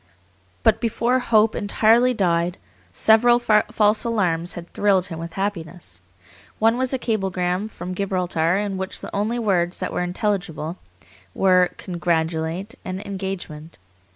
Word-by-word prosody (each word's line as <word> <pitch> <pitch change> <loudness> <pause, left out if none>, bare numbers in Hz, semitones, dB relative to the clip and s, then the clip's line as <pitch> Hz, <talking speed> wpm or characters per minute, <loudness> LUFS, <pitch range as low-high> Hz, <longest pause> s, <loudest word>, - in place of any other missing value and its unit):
But - - +3
before 235 +2 +1
hope 220 -3 +3
entirely 225 +4 +3
died, 175 -5 0 0.3
several 225 - +4
false 215 -2 +2
alarms 180 -7 0
had 175 0 -9
thrilled 195 -3 +2
him 165 -3 -7
with 165 0 -7
happiness. 170 - -5 0.6
One 225 +1 +3
was 260 -1 0
a 265 - +1
cablegram 190 -4 -1
from 185 -3 -7
Gibraltar 180 -3 0
in 200 -1 -2
which 190 0 -4
the - - -7
only 215 +4 0
words 185 -6 0
that - - -3
were - - -1
intelligible 180 -3 -2 0.6
were 185 -2 +4
"congratulate" 165 +2 -2
and 185 0 -5
"engagement." 190 -5 -6
190 Hz, 130 wpm, -22 LUFS, 175-215 Hz, 0.6 s, several